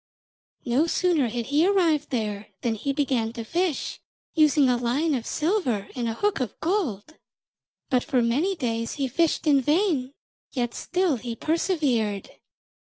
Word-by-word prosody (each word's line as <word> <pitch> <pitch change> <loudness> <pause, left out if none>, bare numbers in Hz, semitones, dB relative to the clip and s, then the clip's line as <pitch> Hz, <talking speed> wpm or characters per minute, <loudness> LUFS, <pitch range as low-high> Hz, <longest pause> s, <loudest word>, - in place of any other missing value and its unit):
No 265 +6 +2
sooner 335 -6 +2
had 235 +1 -3
he 300 +3 +5
arrived 340 -6 +2
there 215 -5 -2
than 235 -3 0
he 250 +6 -2
began 260 -5 0
to 235 -1 -5
fish, 335 +5 -1 0.3
using 305 -3 +4
a 250 - +3
line 250 +7 0
of 240 -4 -2
silver 300 - 0
and 240 -2 -1
a 225 - -3
hook 415 - 0
of 245 -6 -4
gold. 315 - -2 0.7
But 250 -2 +3
for 250 -2 +1
many 295 +12 +1
days 230 -6 -2
he 275 -2 -1
fished 330 +7 +1
in 285 -3 +4
vain, 295 - +1 0.4
yet 240 -3 -1
still 360 -6 0
he 235 0 -5
persevered. 265 - 0
275 Hz, 155 wpm, -25 LUFS, 235-325 Hz, 0.7 s, he